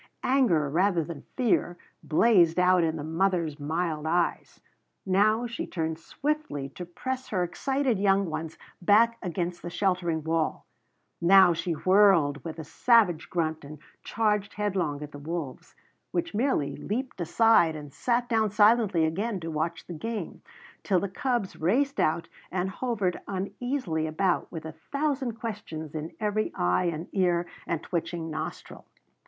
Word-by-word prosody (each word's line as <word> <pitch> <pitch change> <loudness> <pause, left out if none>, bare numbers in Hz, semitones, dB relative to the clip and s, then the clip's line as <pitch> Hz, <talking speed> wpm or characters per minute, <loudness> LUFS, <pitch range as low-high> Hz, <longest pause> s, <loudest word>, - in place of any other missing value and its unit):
Anger, 240 - +3
rather 175 +3 +2
than 155 -2 -8
fear, 215 -8 +1 0.2
blazed 175 -1 +4
out 180 -1 +4
in 160 -1 0
the 150 - -5
mother's 165 -2 0
mild 155 +1 -2
eyes. 175 +1 -1 0.5
Now 215 +5 +3
she 235 -1 -4
turned 160 -2 -3
swiftly 285 - -3
to 180 - -8
press 260 +8 -4
her 185 -4 0
excited 265 +5 0
young 195 -1 +3
ones 160 0 -5 0.2
back 230 +5 +4
against 175 0 -3
the 175 - -5
sheltering 175 -3 0
wall; 160 0 -1 0.6
now 185 0 +7
she 170 +1 -2
whirled 185 -5 +4
with 165 -1 -6
a 160 - -5
savage 185 - +3
grunt 160 -3 -1
and 150 +2 -9 0.3
charged 210 -3 0
headlong 185 -8 -1
at 150 - -8
the 145 - -9
wolves, 155 -3 -6 0.3
which 340 -5 -2
merely 205 - 0
leaped 245 -1 -4
aside 170 -2 +4
and 145 -2 -9
sat 240 0 0
down 220 -2 +2
silently 210 -4 +4
again 195 +6 -2
to 165 0 -4
watch 160 +2 -3
the 175 - -7
game, 225 +7 -5 0.4
till 190 -3 +2
the 200 - -3
cubs 240 -1 -2
raced 270 - +1
out 155 +2 +1 0.2
and 185 +1 -2
hovered 205 -6 -2
uneasily 195 - -2
about 175 +3 0
with 160 -2 -7
a 160 - -5
thousand 275 - -2
questions 200 -9 -6
in 155 +1 -5
every 215 0 0
eye 90 - +1
and 170 0 -2
ear 175 -3 +1 0.2
and 170 -1 -2
twitching 170 -2 -3
nostril. 155 0 -6
180 Hz, 150 wpm, -27 LUFS, 160-215 Hz, 0.6 s, now